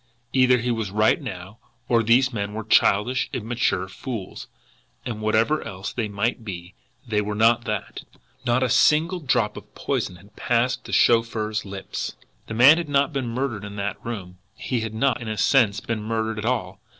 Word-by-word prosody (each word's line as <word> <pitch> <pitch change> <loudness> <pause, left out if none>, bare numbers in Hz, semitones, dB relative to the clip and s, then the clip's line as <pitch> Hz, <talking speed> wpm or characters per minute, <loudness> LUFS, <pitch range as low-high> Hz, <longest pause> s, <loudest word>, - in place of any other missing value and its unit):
Either 130 -1 +5
he 120 +1 -1
was 115 -4 -2
right 105 - +2
now, 100 -4 -8 0.3
or 120 -2 +3
these 125 +3 +3
men 100 -1 -3
were 110 - -4
childish, 110 +3 +3
immature 115 -6 -1
fools 110 0 -7 0.6
and, 110 -3 -4
whatever 110 +8 +2
else 95 +1 -6
they 115 -3 -2
might 110 +4 -2
be, 90 -3 -7 0.3
they 105 -2 +1
were 105 0 -3
not 115 +2 +3
that! 110 -1 -4 0.4
NOT 125 +1 +2
A 130 - +1
SINGLE 155 +8 +3
DROP 130 -8 0
OF - - -12
POISON 90 - -2
HAD 100 +4 -18
PASSED 125 +1 0
THE - - -8
CHAUFFEUR'S 110 -2 +2
LIPS. 95 -1 -5 0.3
The 110 - -5
man 135 +7 +8
had 165 -3 -5
not 140 +2 +2
been 135 -3 -2
murdered 120 -3 -3
in 100 0 -8
that 100 0 -4
room. 95 -6 -6 0.2
He 125 - -2
had 110 -1 -4
not, 125 +1 +1
in 115 - -6
a 110 -1 -3
sense, 110 -2 +3
been 115 -2 -3
murdered 110 0 -2
at 105 - -4
all. 115 -7 -2
115 Hz, 185 wpm, -24 LUFS, 105-125 Hz, 0.6 s, man